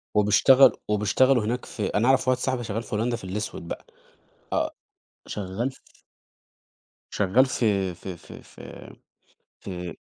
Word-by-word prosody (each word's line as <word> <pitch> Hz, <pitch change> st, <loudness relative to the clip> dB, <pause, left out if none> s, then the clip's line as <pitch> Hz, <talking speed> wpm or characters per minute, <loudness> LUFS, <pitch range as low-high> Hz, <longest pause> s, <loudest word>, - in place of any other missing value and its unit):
وبيشتغل 115 Hz, +6 st, +6 dB, 0.2 s
وبيشتغلوا 105 Hz, +4 st, +3 dB
هناك 120 Hz, +4 st, -2 dB
في 105 Hz, -, -4 dB
أنا 110 Hz, +4 st, +1 dB
أعرف 130 Hz, 0 st, +3 dB
واحد 130 Hz, 0 st, +2 dB
صاحبي، 130 Hz, -1 st, -1 dB
شغّال 115 Hz, 0 st, -3 dB
في 105 Hz, -, -5 dB
هولندا 120 Hz, +3 st, 0 dB
في 115 Hz, -, -9 dB
الأسود 95 Hz, +4 st, -5 dB
بقى، -, -, -6 dB, 0.7 s
آآ -, -, 0 dB, 0.6 s
شغال 105 Hz, +6 st, -3 dB
ف -, -, -23 dB, 1.1 s
شغّال 105 Hz, +6 st, +3 dB
في 100 Hz, -8 st, 0 dB
في 90 Hz, +1 st, -8 dB
في -, -, -13 dB
في -, -, -12 dB, 0.6 s
في 90 Hz, -2 st, -7 dB
110 Hz, 135 wpm, -25 LUFS, 100-125 Hz, 1.1 s, وبيشتغل